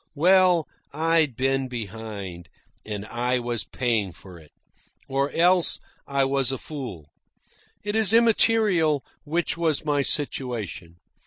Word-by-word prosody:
Well, 180 +1 +4 0.2
I'd 160 -3 +2
been 135 +1 0
behind, 105 -7 -7 0.3
and 105 -1 -5
I 125 +3 0
was 120 -2 -2
paying 110 -7 -1
for 85 +1 -13
it. 75 -2 -18 0.6
Or 140 +1 0
else 175 +2 +3 0.3
I 140 -1 +1
was 135 -1 +1
a 135 - -2
fool. 115 - -8 0.7
It 205 +1 -2
is 220 -3 +3
immaterial 215 - +3 0.2
which 165 +3 -1
was 160 -3 0
my 145 -2 +2
situation. 120 - -2
135 Hz, 120 wpm, -25 LUFS, 110-165 Hz, 0.7 s, Well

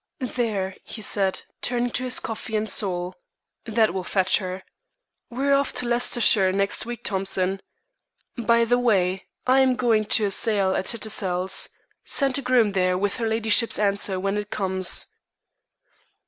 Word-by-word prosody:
"There," 200 -6 -2
he - - -9
said, 195 -2 +1 0.2
turning 245 0 -1
to 250 - -1
his 255 0 +1
coffee 220 0 -5
and 215 0 -1
sole. 180 -3 -1 0.5
"That 220 -4 +1
will 190 -1 -3
fetch 190 0 +1
her. 185 -1 -6 0.7
We 255 +3 -3
are 280 - +3
off 280 0 +1
to 250 - -1
Leicestershire 235 -5 +3
next 200 +3 -1
week, 240 -1 -6
Thompson. 190 -1 -1 0.7
By 235 -1 +2
the 245 +2 +2
way, 190 -6 +1 0.2
I 260 +1 +4
am 260 -1 +3
going 225 -4 +1
to 215 0 +2
a 200 - -1
sale 200 -3 +2
at 190 - -2
Tattersall's. 190 -5 -1 0.3
Send 275 -3 0
a - - -5
groom 250 -5 +2
there 185 -1 +1
with 200 +1 -1
her 230 - -2
ladyship's 225 0 +2
answer 200 -2 0
when 195 +2 -1
it 205 0 -6
comes." 190 -3 0
210 Hz, 160 wpm, -24 LUFS, 190-240 Hz, 0.7 s, I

